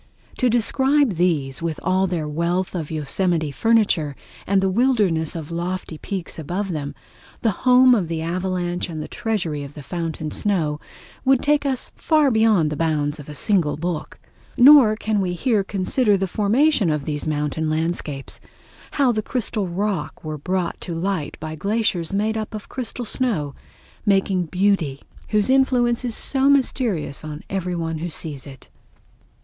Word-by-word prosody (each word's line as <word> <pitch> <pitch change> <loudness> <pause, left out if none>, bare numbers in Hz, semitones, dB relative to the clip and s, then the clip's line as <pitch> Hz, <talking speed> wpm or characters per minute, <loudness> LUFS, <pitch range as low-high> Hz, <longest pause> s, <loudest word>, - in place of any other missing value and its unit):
To 255 - +3
describe 265 +3 +2
these, 155 -7 0
with 165 -2 -3
all 185 +1 +2
their 170 -4 -2
wealth 170 +4 -1
of 165 -5 -4
Yosemite 160 +1 -1
furniture, 195 -7 +2 0.3
and 195 0 +3
the 190 - +1
wilderness 190 - +1
of 160 -1 -6
lofty 170 -1 -4
peaks 190 -4 -5
above 180 +6 -3
them, 145 -3 -4 0.5
the 225 - +3
home 255 +3 +5
of 200 -8 +1
the 165 -1 -3
avalanche 175 +1 -2
and 155 -2 -5
treasury 175 -10 -2
of 140 +1 -10
the 150 - -9
fountain 160 0 -4
snow, 160 -8 0 0.4
would 265 -1 +3
take 290 -1 +2
us 260 -2 -1
far 305 -4 +3
beyond 220 -9 +3
the - - -2
bounds 150 -2 -1
of 145 - -10
a 150 - -7
single 170 -4 +2
book. 170 0 -4 0.4
Nor 255 -4 +8
can 215 -1 -1
we 180 -2 -1
here 215 +2 +1
consider 200 +3 +1
the 195 - 0
formation 220 - +2
of 150 -2 -1
these 150 0 -3
mountain 150 +1 -1
landscapes—how 160 - -3
the 215 -2 -1
crystal 215 -4 -2
rock 185 -2 -3
were 155 -1 -5
brought 180 +3 -2
to 170 - -5
light 170 -3 -2
by 155 0 -5
glaciers 195 -1 -1
made 210 +3 0
up 215 0 -4
of 210 - -7
crystal 250 -1 -5
snow, 205 - -1 0.5
making 195 -3 +1
beauty 180 -6 0 0.3
whose 210 +3 +2
influence 250 -3 +3
is 240 -3 +1
so 270 0 +4
mysterious 245 - +1
on 155 0 -7
every 180 -2 -2
one 165 -2 -3
who 175 +2 -3
sees 150 -3 -5
it. 135 -2 -12
185 Hz, 160 wpm, -22 LUFS, 155-220 Hz, 0.5 s, Nor